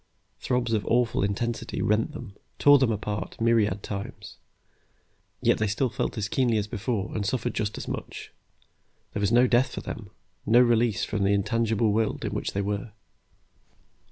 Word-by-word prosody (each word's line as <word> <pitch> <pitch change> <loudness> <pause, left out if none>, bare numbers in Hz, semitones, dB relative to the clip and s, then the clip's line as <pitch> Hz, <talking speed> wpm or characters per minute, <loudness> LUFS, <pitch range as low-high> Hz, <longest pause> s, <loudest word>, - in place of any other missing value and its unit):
Throbs 125 -2 0
of 105 -2 +1
awful 120 -1 +2
intensity 115 +4 -2
rent 105 +7 +1
them, 145 -9 -8 0.2
tore 145 0 +7
them 130 -3 +2
apart 105 -1 -4
myriad 110 -4 +2
times, 100 0 -7 1.1
yet - - +3
they 105 - +1
still 115 +6 0
felt 110 - -3
as 105 -1 -1
keenly 120 -1 +1
as 105 - 0
before 105 -2 -3
and 105 - -1
suffered 120 +5 -1
just 105 -1 -2
as - - -6
much. - - -6 0.8
There 105 - -2
was 100 - +1
no 120 +2 +6
death 125 +1 +2
for - - -4
them, - - -7 0.3
no 115 +3 +5
release 120 -3 +3
from 105 -2 -2
the 100 +1 +3
intangible 110 +1 +1
world 110 0 0
in - - -3
which - - -3
they 100 - 0
were. 105 +2 -3
110 Hz, 170 wpm, -26 LUFS, 105-120 Hz, 1.1 s, tore